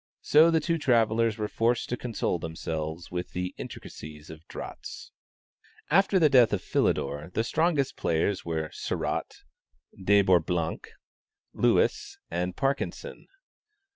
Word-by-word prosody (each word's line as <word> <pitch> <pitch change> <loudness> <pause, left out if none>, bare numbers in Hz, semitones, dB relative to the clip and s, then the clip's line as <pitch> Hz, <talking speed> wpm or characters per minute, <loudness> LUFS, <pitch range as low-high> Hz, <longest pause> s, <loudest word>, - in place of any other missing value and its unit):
So 155 +3 +6
the 165 -1 +3
two 165 +1 -1
travellers 115 -4 +2
were 105 -1 -2
forced 115 +3 0
to 125 - 0
console 115 -7 -2
themselves 80 0 -5
with 90 0 -4
the 90 0 -3
intricacies 75 0 -9
of 80 +1 -13
draughts. - - -8 0.8
After 195 +3 +4
the 165 -4 +6
death 125 -5 +5
of 95 - -1
Philidor, 75 +4 0
the 110 - +2
strongest 155 +1 +1
players 85 +4 0
were 80 -2 -3
Sarratt, - - -3 0.6
De 100 +1 +5
Bourblanc, 85 -2 +1 0.7
Lewis - - +1
and 90 +1 -2
Parkinson. 140 - -3
100 Hz, 125 wpm, -27 LUFS, 85-135 Hz, 0.8 s, So